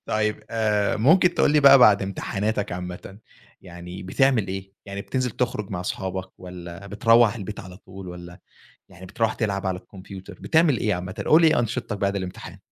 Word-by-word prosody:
طيب. 110 0 -1
آآ، 105 -2 0
ممكن 175 - +4
تقول - - +3
لي 150 - +4
بقى 140 -1 +8
بعد 105 -5 +6
امتحاناتك 100 +1 -3
عامةً، 90 +2 -7 0.4
يعني 90 +1 -10
بتعمل 110 +2 +1
إيه، 95 0 -6
يعني 100 0 -6
بتنزل 130 +2 -2
تخرج 105 -3 -3
مع 90 -3 -4
أصحابك 95 +1 -4
والّا 90 +1 -10
بتروّح 115 +2 +4
البيت 105 -2 -7
على 90 -1 -11
طول، 95 -1 -11
والّا 90 +1 -10 0.5
يعني 90 +1 -13
بترُوح 115 +3 -1
تلعب 100 -4 -2
على 95 -1 -2
الكمبيوتر، 95 0 -12
بتعمل 160 -4 +3
إيه 105 - 0
عامةً، 90 +1 -6
قل 155 - +6
لي - - +6
إيه 155 - +2
أنشطتك 115 -2 -2
بعد 100 0 -1
الامتحان؟ 95 -2 -7
100 Hz, 175 wpm, -24 LUFS, 95-115 Hz, 0.5 s, بقى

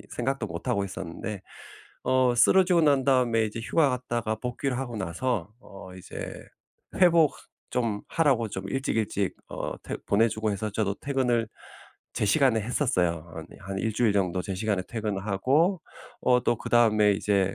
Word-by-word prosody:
생각도 135 +3 -1
못 85 +1 -7
하고 100 -1 +1
있었는데 95 +2 -6 0.6
어 130 -1 +3
쓰러지고 180 +7 +5
난 140 -3 +3
다음에 125 -4 +3
이제 110 +1 -4
휴가 145 +6 +2
갔다가 120 -3 -2
복귀를 125 +3 -3
하고 120 -3 -4
나서 105 +2 -2
어 95 -3 -12
이제 90 - -8 0.5
회복 170 -5 +4 0.3
좀 115 -4 -1
하라고 135 -8 +2
좀 95 -1 -6
일찍 135 0 -1
일찍 100 -3 -1
어 - - -4
퇴 - - -4
보내주고 110 0 +2
해서 105 +2 -3
저도 100 -1 -1
퇴근을 125 -5 0 0.7
제 - - 0
시간에 120 +2 +3
했었어요. 90 - 0
어 80 - -6
네. - - -14
한 95 0 -5
1 110 +3 -1
주일 115 -3 +2
정도 90 -2 0
제 95 - -4
시간에 100 0 -1
퇴근을 105 -4 -3
하고 145 - +2 0.4
어 125 -1 +4
또 120 - +1
그다음에 110 -3 +4
이제 100 -1 +1
110 Hz, 315 characters per minute, -27 LUFS, 100-130 Hz, 0.7 s, 쓰러지고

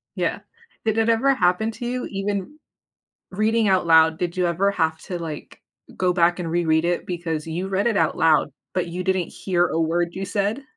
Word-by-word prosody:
Yeah, - - -1 0.5
did 220 0 +1
it 225 0 +2
ever 230 +5 +3
happen 180 +4 +1
to 240 - -7
you, 250 +1 -2
even 200 +6 -3 0.7
reading 215 +2 +1
out 185 -2 +2
loud, 160 -1 +5
did 175 0 -3
you 180 - +2
ever 190 +4 +1
have 160 -4 0
to, 180 -2 -5
like, 160 -3 -8 0.4
go 180 -1 +2
back 175 0 +2
and 170 -2 -3
reread 165 -1 +2
it, 175 0 -1
because 165 -3 -3
you 175 +4 -3
read 195 +3 0
it 225 -4 +1
out 160 -3 +1
loud, 155 -2 +3 0.2
but 185 -2 -1
you 180 +2 -4
didn't 190 -2 0
hear 180 -2 0
a 165 - -2
word 170 +2 +1
you 190 +1 -4
said? 205 +7 -1
180 Hz, 200 wpm, -23 LUFS, 170-200 Hz, 0.7 s, loud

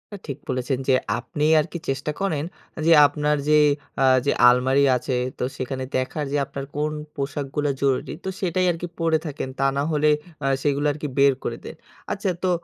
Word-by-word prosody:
এ - - -7
ঠিক 140 0 -4
বলেছেন 130 0 -1
যে, 135 - +4 0.3
আপনি 150 +3 -3
আর 150 - +1
কি 170 - -4
চেষ্টা 135 +3 -1
করেন 160 -7 0 0.4
যে, 165 - +5 0.2
আপনার 150 0 0
যে 150 0 +6 0.4
আ 135 - +5 0.2
যে 140 - +3 0.2
আলমারি 130 +3 +3
আছে। 125 +1 -3 0.2
তো - - -3
সেখানে 130 +1 -4
দেখার 130 +4 -1
যে 145 - +1
আপনার 140 +1 -6
কোন 150 +1 0 0.2
পোশাকগুলো 145 0 -2
জরুরি। 135 -2 0
তো - - -1
সেটাই 185 0 0
আর 165 - -5
কি 175 - -3
পড়ে 165 -1 +2
থাকেন। 140 -3 -4
তা 135 - +2
না 140 - +1
হলে 150 0 +3 0.3
আ - - +1 0.2
সেগুলো 145 0 +1
আর 145 - -6
কি 150 - -2
বের 140 0 +5
করে - - -3
দেন। - - -8 0.4
আচ্ছা 200 -1 -1
তো 185 - +2
145 Hz, 200 wpm, -23 LUFS, 135-155 Hz, 0.4 s, যে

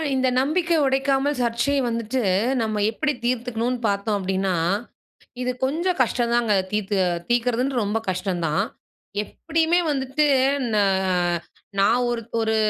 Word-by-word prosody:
இந்த 260 0 +2
நம்பிக்கையை 330 +3 +1
உடைக்காமல் 270 +1 +1
சர்ச்சையை 240 +4 +1
வந்துட்டு, 230 +2 -1 0.4
நம்ம 215 -2 -1
எப்படி 295 +6 -1
தீர்த்துக்கணும்ன்னு 245 0 -1
பார்த்தோம் 200 +1 0
அப்படீன்னா, 190 0 -1 0.9
இது 250 0 0
கொஞ்சம் 340 +6 0
கஷ்டந்தாங்க 235 -2 +1 0.2
தீர்த்து 210 -1 -1 0.3
தீர்க்கிறதுன்றது 245 +1 +1
ரொம்ப 210 +2 0
கஷ்டம் 180 -1 -2
தான். 155 0 +1 0.6
எப்படியுமே 330 - 0
வந்துட்டு, 275 +2 0 0.5
ந - - +2 1.0
நான் 230 +5 +3
ஒரு 235 -1 -1 0.2
ஒரு 220 0 +1
240 Hz, 115 wpm, -23 LUFS, 215-275 Hz, 1.0 s, நான்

